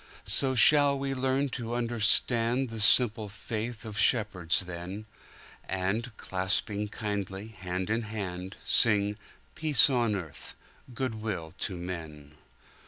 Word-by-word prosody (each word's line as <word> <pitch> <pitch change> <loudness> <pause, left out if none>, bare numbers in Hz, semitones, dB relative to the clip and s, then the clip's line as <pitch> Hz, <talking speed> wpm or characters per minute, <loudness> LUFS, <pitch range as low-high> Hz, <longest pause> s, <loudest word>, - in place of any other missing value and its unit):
So 135 -1 +3
shall 145 +2 +5
we 135 0 -2
learn 135 +1 0
to 120 -2 -5
understandThe 120 +1 +2
simple 110 -1 +4
faith 110 +2 -6
of 105 -3 -6
shepherds 100 -6 +1
then, 90 +3 -7 0.6
And, 100 +5 -3
clasping 95 +2 -2
kindly 100 -1 -5
hand 95 -1 -5
in 115 +1 0
hand, 95 -3 -6
Sing, 105 -2 +3 0.4
"Peace 150 -3 +5
on 120 -4 +1
earth, 85 -7 -7 0.4
good 120 -3 -4
will 90 -8 -5
to 95 - -4
men!" 80 -5 -8
105 Hz, 115 wpm, -28 LUFS, 95-120 Hz, 0.6 s, shall